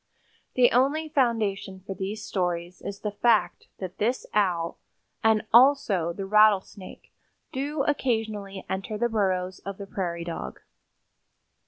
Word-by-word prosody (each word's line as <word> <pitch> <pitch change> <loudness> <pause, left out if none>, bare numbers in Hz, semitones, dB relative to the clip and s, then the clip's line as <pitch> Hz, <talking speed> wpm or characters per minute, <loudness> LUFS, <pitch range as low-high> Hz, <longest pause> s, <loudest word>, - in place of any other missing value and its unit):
The 250 -1 +5
only 285 +6 +2
foundation 220 -9 0
for 195 - -4
these 200 +3 -5
stories 175 -1 -2
is 200 0 -6
the 210 - -2
fact 220 +1 +1
that 185 -1 -7
this 240 +5 0
Owl 180 -5 0 0.4
and 220 -1 +3
also 235 - +5
the 195 +3 -5
rattlesnake 205 -2 +2 0.4
do 280 +2 -2
occasionally 220 -8 -2
enter 195 +3 -3
the 240 +2 +1
burrows 185 -4 0
of 195 -1 -7
the 200 - -7
prairie 175 -3 -3
dog. 165 - -6
205 Hz, 130 wpm, -26 LUFS, 190-235 Hz, 0.4 s, The